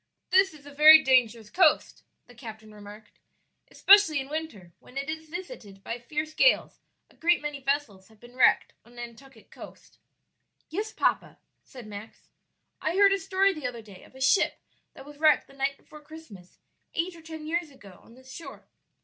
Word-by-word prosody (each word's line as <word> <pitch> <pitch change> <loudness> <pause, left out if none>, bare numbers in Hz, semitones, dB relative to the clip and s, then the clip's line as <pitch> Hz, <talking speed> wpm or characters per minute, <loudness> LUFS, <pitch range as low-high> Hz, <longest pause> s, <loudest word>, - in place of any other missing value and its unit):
"This 380 +1 +4
is 285 -2 -17
a 285 - -12
very 310 +2 +8
dangerous 235 -4 +1
coast," 370 - +2 0.2
the 245 - -18
captain 220 -3 -11
remarked, 210 +1 -14 0.5
"especially 390 -7 +5
in 270 0 -7
winter, 265 - -7
when 255 - -15
it 275 +3 -3
is 315 0 -8
visited 325 - -9
by 230 +1 -5
fierce 305 +5 -5
gales; - - +2 0.3
a - - -25
great 345 +1 +2
many 295 -1 -6
vessels 275 -9 -3
have 220 -1 -23
been 240 +2 -16
wrecked 255 - +3
on 235 +1 -21
Nantucket 240 0 -12
coast." - - -14 0.7
"Yes, 420 +6 -4
papa," - - -1 0.3
said 250 -3 -13
Max; 210 +1 -12 0.5
"I 320 +3 -2
heard 395 0 +5
a 395 - -1
story 390 0 +1
the 305 -7 -5
other 235 -2 -8
day 200 -4 -15
of - - -20
a 265 - -12
ship 265 +9 +2 0.4
that - - -12
was 295 0 -13
wrecked 310 -1 +4
the - - -20
night 275 0 -2
before 305 - -16
Christmas, 295 - -14 0.4
eight 340 +2 -2
or 330 - -14
ten 320 -1 -9
years 335 +1 -2
ago, 200 -9 -16
on 230 - -19
this 260 +1 -16
shore. 335 - -11
275 Hz, 185 wpm, -26 LUFS, 230-320 Hz, 0.7 s, very